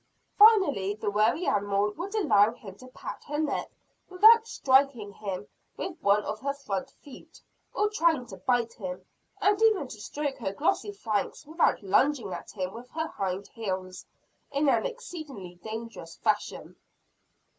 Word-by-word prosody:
Finally, 380 - +5
the 210 -1 -2
wary 220 - +2
animal 205 0 +1
would 370 - -6
allow 215 - +4
him 205 -6 -11
to 255 +5 -14
pat 255 - -8
her 295 +1 -3
neck 310 0 -1 0.4
without 440 +5 +7
striking 265 - +2
at - - -22
him 200 -1 -5 0.3
with 355 -3 -5
one 205 +1 +3
of 215 - -4
her 280 +3 -2
front 200 -10 -4
feet, 280 - -15 0.4
or 420 - +2
trying 335 -10 +2
to 190 -5 -10
bite 235 +3 0
him; 185 -3 -7 0.4
and 410 +1 +3
even 430 -10 +4
to 215 -4 -10
stroke 285 +3 -4
her 195 -5 -3
glossy 320 - 0
flanks 220 - -3
without 315 -6 +1
lunging 210 +1 +2
at 170 - -7
him 185 -2 -4
with 240 +2 -10
her 320 +2 -3
hind 190 0 -3
heels, 185 -4 -5 0.5
in 285 +1 +1
an - - +2
exceedingly 305 - -9
dangerous 220 -6 -7
fashion. 210 -2 -2
235 Hz, 155 wpm, -28 LUFS, 200-315 Hz, 0.5 s, without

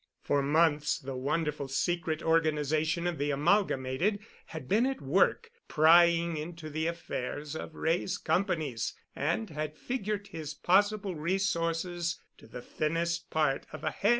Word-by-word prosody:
For 145 -1 +1
months 150 +1 +2
the 135 -4 -6
wonderful 145 +2 -1
secret 165 +3 -1
organization 155 0 +1
of 175 -4 -2
the 145 +1 0
Amalgamated 150 +2 +1 0.3
had 155 -5 -8
been 225 - +3
at 270 - -2
work 195 - +2 0.2
prying 170 +1 +5
into 155 0 -6
the 160 +2 -1
affairs 150 -3 -4
of 160 - -7
Wray's 175 +4 0
companies 155 - -1 0.2
and 165 +7 -1
had 155 0 -4
figured 210 -5 -3
his 155 -5 -6
possible 200 +4 +2
resources 170 0 -1 0.2
to - - -15
the 120 +2 -9
thinnest 170 +4 -2
part 150 -4 0
of - - -9
a - - 0
hair. 205 - 0
165 Hz, 140 wpm, -30 LUFS, 150-175 Hz, 0.3 s, prying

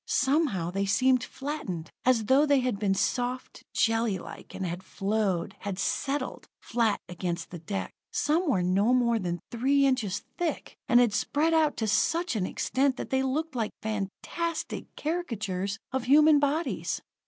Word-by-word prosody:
Somehow, 265 - +1
they 195 +1 -1
seemed 255 +4 +3
flattened, 255 - -5
as 245 -4 +3
though 275 +6 +4
they 285 -2 +4
had 250 -5 -1
been 200 -2 +1
soft, 250 +5 -2
jellylike, 225 -4 -1
and 190 - -3
had 175 +1 -4
flowed, 195 -2 -1
had 200 -3 -4
settled, 275 +8 -2
flat 230 -3 +1
against 175 -1 -4
the 175 - -7
deck. 195 +5 -4 0.2
Some 310 +3 +1
were 185 -9 +2
no 200 +7 +3
more 235 -2 +2
than 175 -3 -2
three 275 +4 +3
inches 245 -8 0 0.2
thick, 345 -2 -2
and 240 - +7
had 240 -4 +4
spread 310 +8 +1
out 315 -2 +3
to 220 - -1
such 330 - +1
an 190 -4 0
extent 265 0 0
that - - -6
they 265 0 +2
looked 295 +4 -1
like 225 -4 -1
fantastic 220 - -3
caricatures 215 - -2
of 260 -2 -2
human 300 +3 +6
bodies. 295 +4 -1
240 Hz, 155 wpm, -28 LUFS, 195-280 Hz, 0.2 s, and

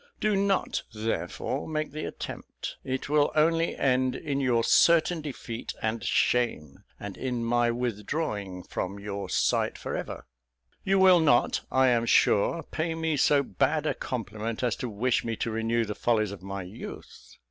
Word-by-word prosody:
Do 215 -1 +2
not, 195 -1 +1
therefore, 110 +1 -3
make 155 -1 -2
the 155 +2 -5
attempt; - - -7
it 130 0 -3
will 145 0 +3
only 165 +2 +2
end 130 -1 +1
in 140 -2 -2
your 125 -4 +2
certain 170 +3 +4
defeat 125 -5 -6
and 110 +1 -2
shame, 115 - 0 0.2
and 100 -2 -7
in 125 -3 -3
my 120 0 +2
withdrawing 105 - -3
from 95 +2 -4
your 100 0 -5
sight - - +1
for - - -4
ever. - - -5 0.6
You 195 0 +2
will 190 -2 +7
not, 145 -7 +3
I 130 0 +4
am 120 -1 +2
sure, 140 +13 +3
pay 165 +1 -3
me 160 -1 0
so 140 0 +4
bad 155 +2 0
a - - +1
compliment 110 -1 -4
as 120 -3 +1
to 125 - -4
wish 115 +4 0
me 115 -1 -2
to 115 - -2
renew 115 +1 0
the 105 - -4
follies 110 -2 +1
of 100 - -8
my 95 0 -5
youth. 90 +5 -10
125 Hz, 165 wpm, -27 LUFS, 110-155 Hz, 0.6 s, will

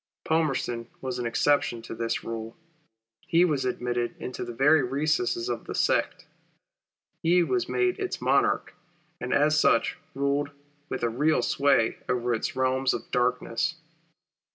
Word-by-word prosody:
Palmerston 135 -7 0
was 130 -2 -4
an 120 - -1
exception 120 -1 +1
to - - -7
this 115 0 -2
rule. 115 +2 -6 0.7
He 170 +2 +4
was 145 -6 0
admitted 120 -1 -2
into 125 - -5
the - - -6
very 145 +6 +4
recesses 155 - 0
of - - -3
the - - -5
sect. - - +1 1.0
He 175 +1 +4
was 370 - -1
made 370 +1 +1
its 385 -2 -3
Monarch, - - +1 0.5
and 125 - -4
as 155 +1 +3
such 115 - +2 0.2
ruled 140 +1 0 0.4
with - - -4
a 120 - +2
real, 150 +7 +1
sway 135 -5 +2
over 120 0 0
its 110 - -2
realms 130 0 +1
of - - -8
darkness. 125 0 0
135 Hz, 145 wpm, -27 LUFS, 120-155 Hz, 1.0 s, He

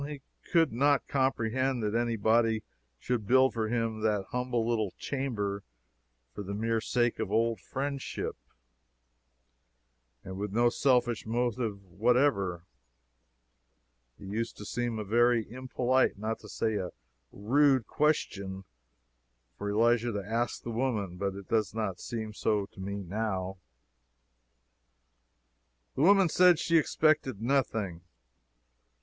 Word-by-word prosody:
He 140 -1 -7 0.3
could 165 -7 +3
not 140 +3 +2
comprehend 130 -1 0
that 105 0 -1
any 120 0 +1
body 110 0 +2 0.3
should 115 - -2
build 130 +2 +5
for 110 -2 -1
him 115 -1 -1
that 105 -3 +1
humble 125 -2 -1
little 110 -4 0
chamber 105 -8 -3 0.7
for - - -6
the 100 0 -5
mere 115 +1 0
sake 120 +1 0
of - - -2
old 115 -1 +1
friendship, 135 +7 -4 1.9
and 95 +1 -7
with 105 -1 -3
no 120 +3 +3
selfish 120 -3 +1
motive 115 -3 -1
whatever. 100 -3 +1 1.5
It - - -11
used 110 +4 -3
to 105 - -8
seem 120 +1 -2
a 105 - -3
very 120 +2 +3
impolite, 130 0 0
not 110 +2 -3
to - - -13
say 110 -2 -1
a 95 -3 -3 0.4
rude, 130 +3 +3
question, 100 -11 -1 0.9
for 100 - -4
Elisha 115 +2 +2
to 100 -2 -4
ask 115 +3 -2
the 120 - -4
woman, 110 -7 -1
but 100 0 -2
it 100 -1 -9
does 110 -2 0
not 100 -5 -2
seem 110 -2 -5
so 105 -1 0
to - - -16
me 100 +1 -4
now. 95 -1 -3 2.3
The - - -2
woman 195 +3 +6
said 180 +1 +5
she 165 +1 +2
expected 155 -7 +1
nothing. 110 -8 0
115 Hz, 130 wpm, -30 LUFS, 105-130 Hz, 2.3 s, woman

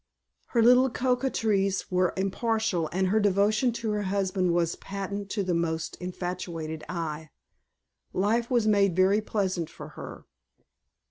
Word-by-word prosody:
Her 230 -2 +2
little 250 +2 +6
coquetries 225 -7 0
were 180 0 +1
impartial 195 -3 0
and 185 +1 +1
her 215 +3 +3
devotion 210 +4 +2
to 230 -2 -3
her 210 0 -1
husband 190 -2 0
was 170 -1 +1
patent 200 0 -5
to 200 0 -1
the 180 -1 -1
most 165 -1 -1
infatuated 175 -3 -5
eye. 160 -3 -4 0.8
Life 225 +5 +1
was 240 -4 +2
made 200 -4 +3
very 190 +3 +4
pleasant 190 -6 -1
for - - -10
her. - - -10
195 Hz, 135 wpm, -27 LUFS, 180-215 Hz, 0.8 s, little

